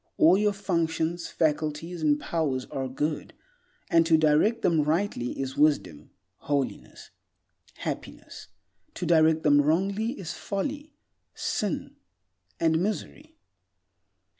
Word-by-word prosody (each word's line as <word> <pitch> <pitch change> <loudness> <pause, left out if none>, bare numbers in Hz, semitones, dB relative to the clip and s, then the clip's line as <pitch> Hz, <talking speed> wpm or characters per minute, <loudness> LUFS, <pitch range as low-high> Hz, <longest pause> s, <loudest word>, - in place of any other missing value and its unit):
All 165 +4 +6
your 210 +1 +2
functions, 170 -3 -1
faculties, 155 +2 -1
and 150 -1 +2
powers 145 -7 -1
are 135 -1 -3
good, 150 +4 -3 0.5
and 165 0 +4
to 160 -1 +5
direct 155 +9 +3
them 165 -3 +3
rightly 155 -4 -1
is 135 -1 -3
wisdom, 145 - +1 0.3
holiness, 140 -2 -4 0.6
happiness; - - -7 0.5
to - - -4
direct 160 -1 +4
them 145 -1 +5
wrongly 195 - 0
is 175 -5 -5
folly, 285 +9 -4 0.4
sin, 205 -6 -3 0.6
and 160 -1 +2
misery. 290 - -4
160 Hz, 110 wpm, -27 LUFS, 150-195 Hz, 0.6 s, All